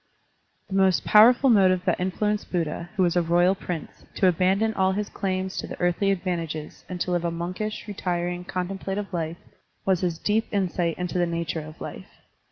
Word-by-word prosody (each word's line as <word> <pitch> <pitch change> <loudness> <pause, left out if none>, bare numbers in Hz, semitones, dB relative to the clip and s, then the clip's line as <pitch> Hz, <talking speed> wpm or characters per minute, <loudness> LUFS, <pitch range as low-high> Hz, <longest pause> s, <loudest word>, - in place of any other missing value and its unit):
The 195 - -8
most 190 -1 +3
powerful 240 +5 +7
motive 185 -4 +4
that 180 - +1
influenced 210 +3 -1
Buddha, 170 -1 -2
who 190 - +2
was 175 -1 +2
a 175 - +4
royal 175 +2 +3
prince, 180 -4 -6
to 190 - +3
abandon 190 +5 +2
all 190 -1 +2
his 210 +1 -2
claims 190 -1 -3
to - - -3
the - - -8
earthly 175 +3 +1
advantages 170 -5 -3
and 180 -1 -5
to 180 - -1
live 175 -1 0
a 170 - +1
monkish, 185 +7 -4
retiring, 180 -3 -2
contemplative 195 +2 -4
life, 165 -1 -2 0.5
was 190 -2 +2
his 175 -3 -1
deep 215 +5 0
insight 180 -4 0
into 180 0 -2
the 175 - +2
nature 170 -1 -2
of 155 +1 -11
life. - - -7
185 Hz, 180 wpm, -25 LUFS, 175-195 Hz, 0.5 s, powerful